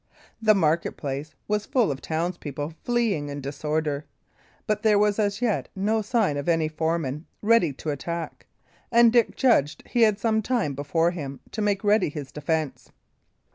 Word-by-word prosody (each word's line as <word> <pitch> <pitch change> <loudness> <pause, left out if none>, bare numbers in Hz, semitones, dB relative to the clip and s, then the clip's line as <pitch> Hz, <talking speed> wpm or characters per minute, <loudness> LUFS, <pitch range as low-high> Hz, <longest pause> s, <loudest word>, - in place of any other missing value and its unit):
The 215 -1 +5
market 165 -2 +1
place 140 +2 -5
was 210 0 -1
full 245 - +2
of 135 - -5
townspeople 160 -2 -3
fleeing 225 -12 0
in 145 0 -5
disorder; 150 +1 -2 0.6
but 215 -1 0
there 215 -2 +4
was 210 0 +2
as 205 +2 0
yet 220 -5 0
no 215 +3 +1
sign 210 - +1
of 145 +4 -2
any 165 -2 +2
foeman 155 -1 -2 0.2
ready 215 -7 +4
to 150 +3 -4
attack, 170 +4 -5 0.4
and 235 -1 +6
Dick 235 -3 +3
judged 150 - +2
he 240 - 0
had 215 -3 +5
some 220 +1 +1
time 220 - 0
before 160 +5 +1
him 140 -6 -6
to 220 - -4
make 205 -1 0
ready 210 -4 +3
his 145 -3 -7
defence. 155 -1 -2
170 Hz, 165 wpm, -25 LUFS, 150-215 Hz, 0.6 s, and